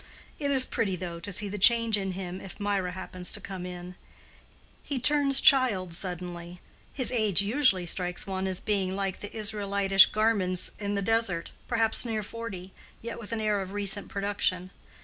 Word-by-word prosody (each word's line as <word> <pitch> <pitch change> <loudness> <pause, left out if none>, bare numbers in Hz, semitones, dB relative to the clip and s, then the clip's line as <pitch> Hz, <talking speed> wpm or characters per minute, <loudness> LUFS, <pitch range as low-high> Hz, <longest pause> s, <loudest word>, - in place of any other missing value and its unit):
It 285 -2 -1
is 265 -2 +7
pretty, 200 -5 -1
though, 170 -1 -6
to 200 +4 -6
see 205 +2 +2
the 205 +1 -5
change 230 +2 +5
in 195 -2 -3
him 185 0 -6
if 195 - -11
Mirah 200 -3 -1
happens 185 -1 -5
to - - -5
come 185 -2 -7
in. 180 0 -8 0.9
He 280 - -4
turns 275 +1 +4
child 235 - +4
suddenly—his 180 - -6
age 215 -6 +2
usually 210 -5 +3
strikes 180 +1 -1
one 190 -1 -3
as 185 -1 -2
being 195 -3 -1
like 195 -1 -3
the 205 - -7
Israelitish 200 -3 +3
garments 205 -5 0
in 205 -1 -2
the 200 - -1
desert, 225 -5 0 0.2
perhaps 225 -1 +1
near 220 -3 -3
forty, 200 -4 -8 0.3
yet 230 0 -6
with 230 -1 -9
an 225 -1 -2
air 210 -2 0
of 190 0 -7
recent 205 0 +1
production. 195 -2 -2
200 Hz, 170 wpm, -27 LUFS, 185-225 Hz, 0.9 s, is